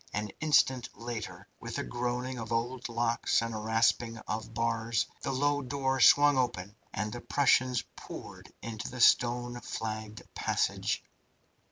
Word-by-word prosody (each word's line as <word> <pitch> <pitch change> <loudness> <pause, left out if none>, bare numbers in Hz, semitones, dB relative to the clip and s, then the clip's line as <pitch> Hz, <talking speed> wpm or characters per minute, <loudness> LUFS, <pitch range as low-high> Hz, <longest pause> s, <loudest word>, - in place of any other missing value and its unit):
An 105 0 -2
instant 130 -5 +3
later, 115 -2 -6
with - - -5
a - - -1
groaning 125 +1 -3
of 115 0 -6
old 120 +2 -2
locks 115 0 +1
and 115 0 -3
a 110 - -3
rasping 115 +1 +1
of 110 +1 -4
bars, 115 0 0 0.2
the - - -2
low 145 +2 +1
door 135 0 -1
swung 145 +1 +7
open, 105 -5 -2 0.2
and 105 +1 -3
the 120 - -6
Prussians 130 -4 +2
poured - - -10
into 110 -1 -5
the 125 - -8
stone 120 0 +3
flagged 110 -1 -5
passage. - - 0
120 Hz, 145 wpm, -30 LUFS, 115-130 Hz, 0.2 s, swung